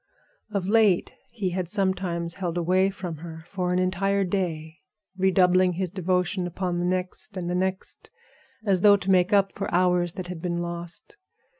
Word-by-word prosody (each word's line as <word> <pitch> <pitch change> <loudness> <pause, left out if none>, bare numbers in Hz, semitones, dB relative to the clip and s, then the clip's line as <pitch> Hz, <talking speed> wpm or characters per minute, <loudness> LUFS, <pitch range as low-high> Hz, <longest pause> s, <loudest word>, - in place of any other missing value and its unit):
Of 200 -3 -2
late 210 -4 +3 0.2
he 205 -6 -2
had 180 -1 -3
sometimes 185 -4 -1
held 175 -3 -3
away 185 +3 +2
from 185 -4 -6
her 160 0 -9
for 180 -1 -2
an 180 - +1
entire 195 +2 +1
day, 165 -4 -3 0.4
redoubling 185 -1 +3
his 180 0 -2
devotion 180 0 0
upon 175 0 -2
the 175 - 0
next 185 +2 -3
and 175 -2 -3
the 175 - -1
next, 185 - -3 0.6
as 190 -3 +2
though 205 0 +7
to 195 -1 -1
make 185 +1 +4
up 195 -1 +3
for 195 - -4
hours 180 -1 +2
that 185 - -6
had 175 -2 -7
been 170 -1 -2
lost. 175 - -5
185 Hz, 170 wpm, -25 LUFS, 175-190 Hz, 0.6 s, though